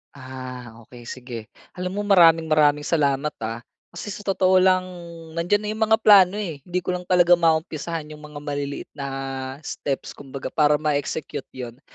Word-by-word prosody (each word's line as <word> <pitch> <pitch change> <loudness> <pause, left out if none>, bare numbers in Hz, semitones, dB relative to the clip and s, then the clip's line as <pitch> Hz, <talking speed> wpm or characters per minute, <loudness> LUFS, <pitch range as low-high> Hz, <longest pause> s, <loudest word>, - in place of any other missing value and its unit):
Ah 130 -2 -8 0.2
okey, 120 -1 -13
sige. 125 0 -7 0.4
Alam 180 0 -3
mo - - +1
maraming, 165 -4 +6
maraming 150 -1 +3
salamat 145 -2 +1
ah. 115 +1 -3 0.3
Kasi 205 - -7
sa 205 - -7
totoo 190 -2 +3
lang, 185 0 +4 0.5
nandiyan 175 +5 +1
na - - -4
'yong 220 +1 0
mga 220 - +6
plano, 200 -2 +7
eh, 170 -9 -4
hindi 180 0 -2
ko - - -1
lang 180 0 -6
talaga 175 -1 +5
maumpisahan 160 -1 0
'yong 150 - -10
mga 150 -1 -9
maliliit 145 -1 -4
na 140 -2 -6 0.6
steps 140 -1 -4
kumbaga, 135 -1 -8
para 150 -1 +4
ma-execute 150 -1 -2
'yon. 125 -1 -7
155 Hz, 165 wpm, -23 LUFS, 140-180 Hz, 0.6 s, plano